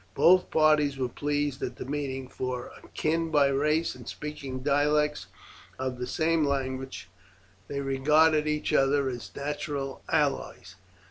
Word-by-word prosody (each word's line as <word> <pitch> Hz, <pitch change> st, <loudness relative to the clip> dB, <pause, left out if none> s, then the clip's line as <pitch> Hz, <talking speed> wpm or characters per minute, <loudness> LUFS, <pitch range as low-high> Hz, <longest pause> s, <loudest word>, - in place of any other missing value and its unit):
Both 185 Hz, +1 st, +5 dB
parties 150 Hz, -3 st, +3 dB
were 130 Hz, -2 st, -1 dB
pleased 145 Hz, +1 st, -2 dB
at -, -, -3 dB
the -, -, -7 dB
meeting, 135 Hz, -2 st, -3 dB
for, 125 Hz, -1 st, -4 dB
akin 165 Hz, +1 st, -1 dB
by 145 Hz, -3 st, +4 dB
race 150 Hz, +4 st, +1 dB
and -, -, -13 dB
speaking 140 Hz, -4 st, -6 dB
dialects 150 Hz, +1 st, +1 dB, 0.5 s
of 130 Hz, -1 st, -3 dB
the 125 Hz, -, -3 dB
same 165 Hz, 0 st, +1 dB
language, 130 Hz, -6 st, -2 dB, 0.6 s
they 140 Hz, 0 st, -3 dB
regarded 150 Hz, +3 st, +3 dB
each 150 Hz, 0 st, -1 dB
other 135 Hz, 0 st, +3 dB
as 120 Hz, -2 st, -6 dB
natural 140 Hz, -1 st, -4 dB
allies. -, -, -1 dB
145 Hz, 135 wpm, -28 LUFS, 135-150 Hz, 0.6 s, Both